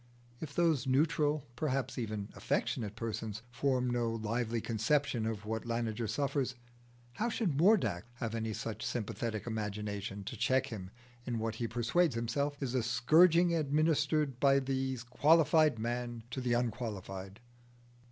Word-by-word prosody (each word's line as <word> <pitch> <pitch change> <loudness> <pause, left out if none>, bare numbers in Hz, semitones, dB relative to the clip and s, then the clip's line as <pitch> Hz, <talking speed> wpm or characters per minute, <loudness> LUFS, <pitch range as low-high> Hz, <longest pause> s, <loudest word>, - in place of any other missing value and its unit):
If 145 -3 -7
those 160 -7 +2
neutral, 150 +1 +2
perhaps 135 -1 -1
even 105 -3 -3
affectionate 105 -2 -1
persons, 110 -1 -4
form 125 0 +1
no 120 -1 0
lively 115 +1 -1
conception 115 +1 0
of 110 -2 -4
what 110 +1 -2
Laniger 115 -1 -2
suffers, 135 +1 -1 0.6
how 235 +3 0
should 200 - 0
Mordax 170 - +4
have 115 -2 -4
any 110 -1 -2
such 110 +1 -4
sympathetic 110 -2 -3
imagination 105 -2 -4
to - - -6
check 130 0 +2
him 105 -8 -7 0.4
in 120 -2 -1
what 110 0 -2
he 115 +1 -3
persuades 120 +7 +1
himself 140 +5 -1
is 130 -2 -2
a 130 - +2
scourging 165 +9 +5
administered 150 -2 +1
by 140 0 +5
the 130 -1 -1
qualified 155 +1 +4
man 120 0 -3
to 130 - -3
the 125 -1 +1
unqualified? 105 -5 -3
120 Hz, 140 wpm, -33 LUFS, 110-145 Hz, 0.6 s, scourging